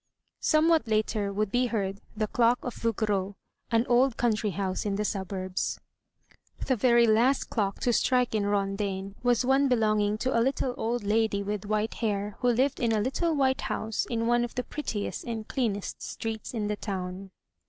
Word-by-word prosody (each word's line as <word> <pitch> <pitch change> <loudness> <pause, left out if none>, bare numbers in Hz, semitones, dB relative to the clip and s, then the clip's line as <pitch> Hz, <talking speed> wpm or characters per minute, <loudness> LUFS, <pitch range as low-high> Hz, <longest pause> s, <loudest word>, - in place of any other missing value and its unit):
Somewhat 315 -2 +3
later 215 -2 0
would 205 0 -1
be 250 0 +2
heard 200 -4 -2 0.2
the 215 - +1
clock 235 +3 +3
of 245 - -3
Vougereau, 205 -3 -1 0.3
an 230 0 +2
old 250 0 +3
country 220 -3 +1
house 190 0 -2
in 205 -2 -1
the 210 +1 -1
suburbs. 190 -2 -3 0.9
The 260 - +2
very 235 +1 +4
last 235 +5 +3
clock 200 -4 -1
to 240 - +2
strike 250 0 +2
in 205 -2 +1
Rondaine 195 -1 -1
was 245 0 +2
one 270 +2 +4
belonging 215 -4 +2
to 255 +3 -1
a 230 - +4
little 260 0 0
old. 235 0 -2
lady 210 -1 +1
with 205 0 -3
white 215 +1 0
hair, 205 -2 -2
who 250 - 0
lived 260 +4 +1
in 230 -2 +1
a 215 - +2
little 310 +9 0
white 265 -2 +2
house 220 0 -2
in 230 -1 -1
one 240 +1 +3
of 240 - -5
the 250 - -1
prettiest 230 -9 -4
and 225 -2 -4
cleanest 215 -6 -2
streets 220 -1 -5
in 210 -2 -1
the 210 - -1
town. 190 -1 -5
220 Hz, 180 wpm, -28 LUFS, 205-245 Hz, 0.9 s, very